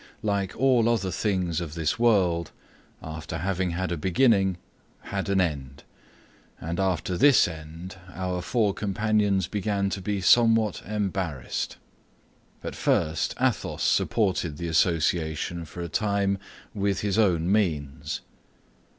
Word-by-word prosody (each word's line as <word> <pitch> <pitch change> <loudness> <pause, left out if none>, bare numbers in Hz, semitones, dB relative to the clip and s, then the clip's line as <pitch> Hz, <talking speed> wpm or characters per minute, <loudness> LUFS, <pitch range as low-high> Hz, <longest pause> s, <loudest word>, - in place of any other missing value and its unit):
like 100 -3 -1
all 125 -3 +4
other 100 -5 0
things 90 -6 -1
of 80 -2 -6
this 80 +5 -1
world, 90 -8 +3 0.5
after 80 +1 -6
having 95 +1 -1
had 85 +1 -2
a 85 - -1
beginning 95 - +3 0.4
had 100 0 -4
an 100 -1 +2
end, 70 -6 -2 0.8
and 85 +3 -4
after 95 -1 0
this 140 +8 +6
end 80 +3 -9 0.2
our 90 -1 -2
four 105 -1 +1
companions 105 -2 +1
began 100 -1 -1
to 95 - -3
be 100 +1 -2
somewhat 115 +1 +4
embarrassed. 95 - -3 0.9
At - - -5
first, 80 0 0
Athos - - 0
supported 90 -8 +1
the 85 - -4
association 80 0 +1
for 85 +3 -8
a - - -4
time 100 +1 0 0.3
with 100 -1 0
his 105 +1 0
own 90 -4 +2
means. 80 -10 -1
95 Hz, 125 wpm, -26 LUFS, 85-105 Hz, 0.9 s, this